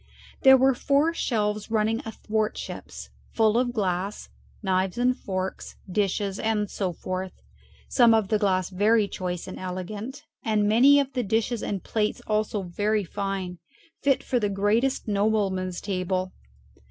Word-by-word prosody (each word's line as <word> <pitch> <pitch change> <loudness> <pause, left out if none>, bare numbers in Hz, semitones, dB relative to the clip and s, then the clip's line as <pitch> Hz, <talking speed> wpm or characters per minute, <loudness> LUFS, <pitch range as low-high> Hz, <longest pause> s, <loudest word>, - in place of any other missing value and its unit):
There 265 0 +8
were 265 +1 +4
four 285 +6 +2
shelves 210 -8 -1
running 220 +1 +1
athwartships 220 0 -4 0.2
full 220 -1 +3
of 245 0 +2
glass, 195 -3 -2 0.3
knives 190 0 0
and 250 +1 +2
forks, 190 -3 -4
dishes, 195 0 -1
and 215 -2 0
so 190 -3 -2
forth, 185 +2 -5 0.5
some 235 -3 +5
of 215 -3 +1
the 215 -1 +2
glass 185 -3 +1
very 210 +3 +3
choice 180 -3 -4
and - - -7
elegant, 205 +9 -6 0.2
and 215 -2 +1
many 260 +7 +6
of 275 -1 -1
the 250 - 0
dishes 225 +2 0
and 195 -3 -3
plates 215 -1 -1
also 215 -1 0
very 205 +4 0
fine, 195 -2 -4 0.4
fit 275 -2 +2
for 250 - 0
the 205 -2 0
greatest 215 +8 +1
nobleman's 200 -3 0
table. 185 -1 -2
210 Hz, 140 wpm, -26 LUFS, 190-230 Hz, 0.5 s, There